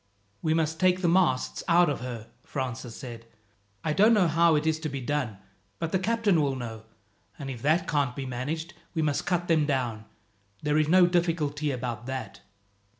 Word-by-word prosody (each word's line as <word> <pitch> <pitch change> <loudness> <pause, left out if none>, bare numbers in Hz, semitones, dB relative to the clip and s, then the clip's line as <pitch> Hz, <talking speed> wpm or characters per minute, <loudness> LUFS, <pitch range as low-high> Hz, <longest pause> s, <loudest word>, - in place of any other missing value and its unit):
"We 160 0 +1
must 160 0 0
take 185 0 +3
the - - +4
masts 170 -7 +2
out 175 +1 +5
of 145 - -1
her," 115 -2 -7
Francis 125 -3 -5
said. 115 -3 -9 0.6
"I 155 - 0
don't 215 +7 +5
know 190 -5 +4
how 165 0 +4
it 150 +1 0
is 160 0 +1
to 155 -1 -3
be 140 -1 -4
done, 130 -5 -2 0.4
but 165 - -3
the 190 - +2
captain 210 -4 +2
will 140 -2 0
know, 110 -3 -7 0.5
and 135 -2 -5
if 120 -3 -8
that 155 +4 +2
can't 140 -5 0
be 135 - -4
managed 145 +7 -4 0.2
we 160 - +1
must 145 -2 -1
cut 175 -1 0
them 155 -3 +3
down. 120 -6 -1 0.6
There 150 +1 +2
is 155 - +2
no 180 +2 +6
difficulty 165 -4 0
about 120 -3 -4
that. 130 0 -5
150 Hz, 190 wpm, -27 LUFS, 130-170 Hz, 0.6 s, no